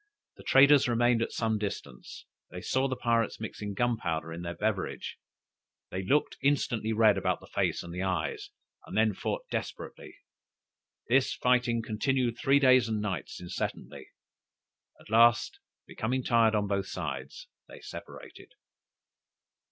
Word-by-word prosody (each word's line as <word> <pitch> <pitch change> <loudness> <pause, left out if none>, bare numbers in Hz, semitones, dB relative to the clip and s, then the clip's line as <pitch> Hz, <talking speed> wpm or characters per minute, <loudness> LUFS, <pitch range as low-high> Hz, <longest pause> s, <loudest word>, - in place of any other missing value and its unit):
The - - -13
traders 140 +1 +6
remained 120 0 +2
at - - -1
some 110 -2 -1
distance; 80 - -6 0.2
they 90 - -7
saw 130 +8 0
the 130 - -2
pirates 115 -2 0
mixing 105 -2 -6
gunpowder 85 -9 -1
in 85 - -7
their 85 0 -5
beverage, 105 -3 -3 0.7
they 95 - -3
looked 145 +10 +1
instantly 120 -6 +1
red 110 -3 +4
about - - 0
the - - -14
face - - -1
and 85 - -9
the 90 - -4
eyes, 90 -6 -2 0.4
and - - -5
then 110 -1 +3
fought - - -4
desperately. - - -6 0.9
This 130 +2 +2
fighting 125 -2 +1
continued 120 +2 -1
three 135 +1 +4
days 130 -4 +5
and 110 -1 -1
nights 95 -7 -4
incessantly; 90 -1 -5 0.9
at - - -16
last, 115 +1 +4 0.3
becoming 125 +3 -2
tired 115 -2 +3
on 105 -1 +1
both 100 -1 -1
sides, 75 -7 -6 0.2
they - - -12
separated. - - -11
110 Hz, 140 wpm, -29 LUFS, 95-125 Hz, 0.9 s, traders